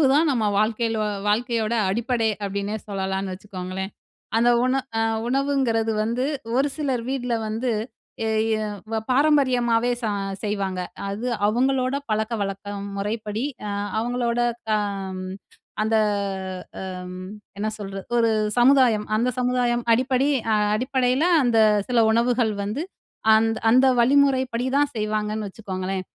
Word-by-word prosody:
உணவுதான் 295 Hz, +3 st, +4 dB
நம்ம 235 Hz, -5 st, +1 dB
வாழ்க்கையில 225 Hz, +1 st, +1 dB, 0.3 s
வாழ்க்கையோட 230 Hz, +1 st, +1 dB, 0.2 s
அடிப்படையே, 230 Hz, 0 st, 0 dB
அப்டின்னே 200 Hz, +2 st, -2 dB
சொல்லலான்னு 190 Hz, -1 st, -2 dB
வச்சுக்கோங்களேன். 190 Hz, 0 st, -6 dB, 0.5 s
அந்த 235 Hz, +1 st, +4 dB
உண 255 Hz, -, +2 dB, 0.3 s
அ -, -, +2 dB, 0.3 s
உணவுங்கிறது 260 Hz, -4 st, +1 dB
வந்து 235 Hz, +4 st, -1 dB, 0.3 s
ஒரு 275 Hz, +2 st, +3 dB
சிலர் 265 Hz, -6 st, -1 dB
வீட்ல 250 Hz, -3 st, -2 dB
வந்து, 230 Hz, +3 st, -1 dB, 0.5 s
எ -, -, 0 dB, 0.3 s
எ -, -, -3 dB, 0.3 s
வ -, -, +1 dB, 0.2 s
பாரம்பரியமாவே 250 Hz, -4 st, +3 dB
ச -, -, +1 dB, 0.4 s
செய்வாங்க. 200 Hz, -3 st, -2 dB, 0.3 s
அது 215 Hz, +5 st, -4 dB, 0.2 s
அவங்களோட 255 Hz, +3 st, +1 dB
பழக்கவழக்க 210 Hz, -2 st, -2 dB, 0.3 s
முறைப்படி 215 Hz, +3 st, -2 dB, 0.2 s
அ -, -, -3 dB, 0.3 s
அவங்களோட 240 Hz, 0 st, -1 dB, 0.3 s
தம் 195 Hz, -3 st, -1 dB, 0.6 s
அந்த 220 Hz, +1 st, +2 dB, 0.8 s
அ -, -, -5 dB, 0.2 s
அம் 180 Hz, 0 st, -8 dB, 0.4 s
என்ன 210 Hz, +2 st, -1 dB
சொல்றது, 195 Hz, -2 st, -6 dB
ஒரு 230 Hz, -1 st, +4 dB, 0.3 s
சமுதாயம். 245 Hz, -4 st, +5 dB
அந்த 235 Hz, +3 st, +2 dB
சமுதாயம் 245 Hz, -1 st, +1 dB
அடிப்படி 255 Hz, +3 st, +2 dB, 0.5 s
அடிப்படையில, 255 Hz, +3 st, +1 dB, 0.2 s
அந்த 240 Hz, -2 st, +2 dB, 0.3 s
சில 245 Hz, -2 st, +2 dB
உணவுகள் 235 Hz, 0 st, +2 dB
வந்து 210 Hz, +8 st, -3 dB, 0.5 s
அந்த 225 Hz, +1 st, +2 dB
அந்த 255 Hz, +3 st, +5 dB
வழிமுறைப்படிதான் 260 Hz, +1 st, +2 dB
செய்வாங்கன்னு 215 Hz, -1 st, -2 dB
வச்சுக்கோங்களேன். 190 Hz, -2 st, -4 dB
230 Hz, 115 wpm, -23 LUFS, 210-250 Hz, 0.8 s, சமுதாயம்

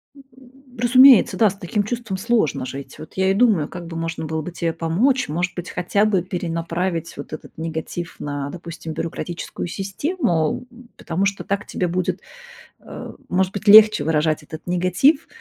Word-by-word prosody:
М. 275 Hz, -, -14 dB, 0.6 s
Разумеется, 255 Hz, +1 st, +7 dB
да, 220 Hz, -3 st, +5 dB
с 195 Hz, -, -7 dB
таким 205 Hz, +3 st, -1 dB
чувством 230 Hz, -3 st, -4 dB
сложно 215 Hz, -, 0 dB
жить. 135 Hz, +2 st, -8 dB
Вот 155 Hz, -, -11 dB
я 190 Hz, 0 st, +2 dB
и -, -, +3 dB
думаю, 200 Hz, -9 st, +3 dB
как 175 Hz, -2 st, -8 dB
бы 165 Hz, -1 st, -6 dB
можно 165 Hz, -1 st, -3 dB
было 160 Hz, 0 st, -2 dB
бы 180 Hz, -, -6 dB
тебе 165 Hz, -1 st, -2 dB
помочь. 205 Hz, +12 st, +1 dB
Может 175 Hz, +4 st, -1 dB
быть, 175 Hz, -1 st, -6 dB
хотя 200 Hz, +4 st, +1 dB
бы 195 Hz, -4 st, +2 dB
перенаправить 170 Hz, -1 st, -3 dB
вот 145 Hz, -, -8 dB
этот 155 Hz, -, -10 dB
негатив 165 Hz, +1 st, -5 dB
на, 145 Hz, -1 st, -4 dB
допустим, 165 Hz, -1 st, -8 dB
бюрократическую 170 Hz, +2 st, -5 dB
систему, 195 Hz, -, -1 dB
м, 245 Hz, 0 st, -16 dB
потому 170 Hz, +4 st, -1 dB
что 200 Hz, 0 st, -1 dB
так 200 Hz, +1 st, -2 dB
тебе 180 Hz, -, -2 dB
будет, 180 Hz, +1 st, -2 dB, 0.6 s
а, -, -, -9 dB
может 185 Hz, +1 st, +1 dB
быть, 210 Hz, +1 st, -6 dB
легче 215 Hz, -2 st, +8 dB
выражать 155 Hz, 0 st, +1 dB
этот 155 Hz, +2 st, -10 dB
негатив. 185 Hz, -, +2 dB
180 Hz, 170 wpm, -21 LUFS, 165-210 Hz, 0.6 s, легче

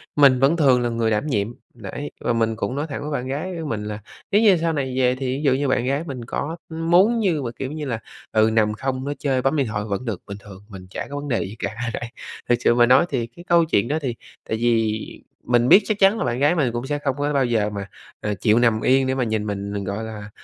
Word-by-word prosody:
mình 140 Hz, -3 st, +6 dB
vẫn 140 Hz, +6 st, +3 dB
thường 135 Hz, -6 st, +4 dB
là 120 Hz, -, 0 dB
người 115 Hz, -1 st, 0 dB
đảm 110 Hz, +7 st, 0 dB
nhiệm. 105 Hz, -8 st, 0 dB, 0.3 s
Đấy, 120 Hz, +6 st, -7 dB
và 120 Hz, -, 0 dB
mình 115 Hz, -1 st, +1 dB
cũng 110 Hz, +3 st, -3 dB
nói 145 Hz, +3 st, -2 dB
thẳng 140 Hz, -, -5 dB
với 150 Hz, -, -5 dB
bạn 130 Hz, -3 st, -2 dB
gái 155 Hz, +8 st, -3 dB
của -, -, -5 dB
mình 105 Hz, -2 st, -3 dB
là 105 Hz, 0 st, -5 dB, 0.3 s
nếu 205 Hz, -, +4 dB
như 205 Hz, -5 st, +6 dB
sau 165 Hz, 0 st, 0 dB
này 135 Hz, -4 st, -2 dB
về 125 Hz, -1 st, +3 dB
thì 135 Hz, +1 st, -5 dB
ví 145 Hz, -, -5 dB
dụ 140 Hz, -3 st, +4 dB
như 140 Hz, +2 st, 0 dB
bạn 125 Hz, -2 st, +1 dB
gái 140 Hz, +4 st, 0 dB
mình 135 Hz, -7 st, -6 dB
có 160 Hz, +7 st, -4 dB
muốn 175 Hz, +8 st, +3 dB
như 180 Hz, -9 st, +1 dB
mà, 120 Hz, -3 st, -3 dB
kiểu 135 Hz, 0 st, -5 dB
như 155 Hz, -1 st, -5 dB
là, 120 Hz, -5 st, -3 dB, 0.3 s
ừ, 110 Hz, 0 st, +4 dB
nằm 105 Hz, -1 st, +2 dB
không, 130 Hz, +3 st, -3 dB
nói 145 Hz, +1 st, -3 dB
chơi, 135 Hz, -3 st, 0 dB
bấm 135 Hz, +4 st, +1 dB
điện 140 Hz, -4 st, +1 dB
thoại 105 Hz, -1 st, -3 dB
vẫn 105 Hz, +4 st, -3 dB
được, 110 Hz, -7 st, -3 dB
bình 100 Hz, -, -6 dB
thường, 100 Hz, -1 st, -13 dB
mình 95 Hz, -3 st, -10 dB
chả -, -, -5 dB
có 140 Hz, -, -6 dB
vấn 145 Hz, 0 st, -5 dB
đề 120 Hz, -5 st, 0 dB
gì 100 Hz, +3 st, -7 dB
cả -, -, -2 dB, 0.2 s
đấy. 120 Hz, -, -4 dB, 0.4 s
Thực 120 Hz, -, +5 dB
sự 120 Hz, -, +3 dB
mà 120 Hz, 0 st, +6 dB
nói 130 Hz, +7 st, +5 dB
thì 120 Hz, -4 st, -2 dB
cái 170 Hz, +10 st, -15 dB
câu 170 Hz, -2 st, +4 dB
chuyện 115 Hz, -8 st, +1 dB
đó 150 Hz, +4 st, 0 dB
thì 125 Hz, -5 st, -2 dB, 0.3 s
tại 110 Hz, -, 0 dB
vì 115 Hz, -2 st, 0 dB, 0.2 s
mình 120 Hz, 0 st, +2 dB
biết 195 Hz, -, +8 dB
chắc 215 Hz, -2 st, -1 dB
chắn 195 Hz, +3 st, +5 dB
là -, -, -1 dB
bạn 120 Hz, 0 st, -1 dB
gái 145 Hz, +5 st, +3 dB
mình 140 Hz, -8 st, +1 dB
cũng 120 Hz, +2 st, -3 dB
sẽ 145 Hz, 0 st, -1 dB
không 140 Hz, -3 st, -1 dB
có 145 Hz, +1 st, -1 dB
bao 135 Hz, -2 st, +2 dB
giờ 110 Hz, -4 st, +1 dB
mà, 100 Hz, -1 st, -6 dB, 0.3 s
à, 105 Hz, -, -1 dB
chịu 105 Hz, +4 st, +2 dB
nằm 115 Hz, -2 st, +3 dB
yên 130 Hz, +1 st, +3 dB
để 130 Hz, -, 0 dB
mà 130 Hz, -, 0 dB
nhìn 110 Hz, -2 st, -1 dB
mình, 100 Hz, -1 st, -4 dB
ờ, 100 Hz, -, -2 dB
gọi 100 Hz, +3 st, -4 dB
là, 110 Hz, -2 st, -7 dB
125 Hz, 280 wpm, -22 LUFS, 110-145 Hz, 0.4 s, biết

